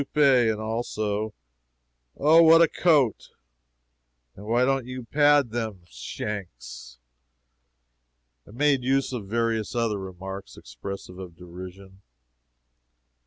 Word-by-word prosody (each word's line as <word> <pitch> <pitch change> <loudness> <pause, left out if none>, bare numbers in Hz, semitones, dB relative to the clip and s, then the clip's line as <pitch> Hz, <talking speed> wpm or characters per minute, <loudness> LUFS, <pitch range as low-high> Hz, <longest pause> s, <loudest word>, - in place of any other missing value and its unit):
and 125 -7 +4
also, 110 -1 -3 0.9
"Oh, 155 +4 +6
what 165 0 +7
a 165 - +6
coat!" 145 - +1 1.1
and 105 +2 -11
"Why 120 +3 +2
don't 135 -2 0
you 130 0 -6
pad 145 -1 +3
them 110 -6 -4
shanks?" 65 - -7 1.5
and 105 - -14
made 145 -2 +2
use 135 +1 0
of 110 -6 -5
various 115 +1 -1
other 115 -4 0
remarks 95 +1 -8
expressive 100 -2 -9
of 90 -3 -9
derision. 95 +2 -12
110 Hz, 105 wpm, -25 LUFS, 95-130 Hz, 1.5 s, what